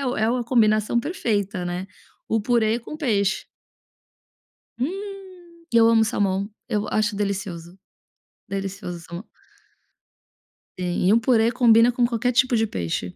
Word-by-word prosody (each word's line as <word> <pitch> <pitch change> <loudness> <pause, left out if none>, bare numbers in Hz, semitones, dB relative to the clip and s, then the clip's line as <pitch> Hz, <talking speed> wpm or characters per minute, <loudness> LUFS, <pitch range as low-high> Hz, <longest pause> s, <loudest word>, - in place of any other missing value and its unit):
é 250 -5 0
uma 245 0 -1
combinação 220 -1 +2
perfeita, 210 - -2
né, 175 +2 -4 0.4
o 220 -1 0
purê 230 -1 +2
com 245 - -9
peixe. 210 - 0 1.3
Hum! 390 +9 -4 0.5
E - - +5
eu 225 0 +6
amo 225 -1 +5
salmão, 200 -2 -1 0.2
eu 210 -3 -1
acho 215 -1 0
delicioso, 190 -4 -4 0.7
delicioso 195 -2 -5
o - - -11
salmão. 170 +5 -9 1.5
Sim 180 0 -1
e 205 - +5
um 230 - +6
purê 230 -1 +3
combina 235 -1 +5
com 245 0 +1
qualquer 240 +1 0
tipo 255 0 +2
de 225 -1 +2
peixe. 90 - -4
220 Hz, 135 wpm, -23 LUFS, 195-240 Hz, 1.5 s, eu